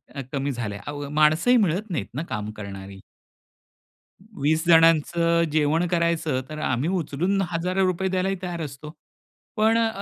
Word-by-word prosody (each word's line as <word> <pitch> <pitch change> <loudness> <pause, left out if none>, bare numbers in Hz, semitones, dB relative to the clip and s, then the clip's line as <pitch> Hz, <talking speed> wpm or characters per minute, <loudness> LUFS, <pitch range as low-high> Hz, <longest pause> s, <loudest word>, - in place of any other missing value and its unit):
अ, 140 - -3
कमी 140 0 -2
झालाय. 110 -5 -5
अहो, 145 -1 -5
माणसंही 155 +11 +4
मिळत 200 0 0
नाहीत 135 - -2
ना 155 - -2
काम 105 -2 -4
करणारी. 95 -1 -8 1.4
20 155 +4 +1
जणांचं 165 +1 +4
जेवण 155 +3 +2
करायचं 165 -5 0
तर 155 0 -6
आम्ही 130 +5 0
उचलून 175 +5 -1
हजारो 180 +3 0
रुपये 185 +1 -1
द्यायलाही 190 +1 0
तयार 175 -2 -4
असतो, 150 0 -7 0.7
पण 220 +1 +3
अ, 230 -1 +3
160 Hz, 145 wpm, -24 LUFS, 140-175 Hz, 1.4 s, माणसंही